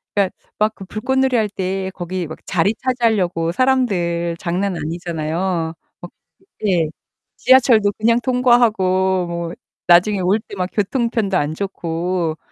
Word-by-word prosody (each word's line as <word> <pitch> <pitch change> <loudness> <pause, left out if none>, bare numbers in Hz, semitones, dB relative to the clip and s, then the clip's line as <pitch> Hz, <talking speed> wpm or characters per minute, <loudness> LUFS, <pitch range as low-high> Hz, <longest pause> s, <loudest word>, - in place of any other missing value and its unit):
그니까 195 -2 +2 0.3
막 215 +1 +1
그 195 - -10
불꽃놀이 265 +6 0
할 215 -2 +1
때 190 -1 -3
거기 180 0 -4
막 160 - -9
자리 190 +4 +1
차지하려고 210 -10 0
사람들 180 -9 +1
장난 185 +2 -1
아니잖아요. 165 +1 -2 0.3
막 175 - -9 0.5
예. 175 -5 +2 0.5
지하철도 235 -6 +5
그냥 230 +2 +2
통과하고 210 -8 +2
뭐 170 0 -4 0.3
나중에 185 +4 +5
올 190 +4 +2
때 200 - -11
막 180 0 -2
교통편도 215 -2 0
안 145 +1 -1
좋고 170 -3 -2
190 Hz, 275 characters per minute, -19 LUFS, 170-220 Hz, 0.5 s, 지하철도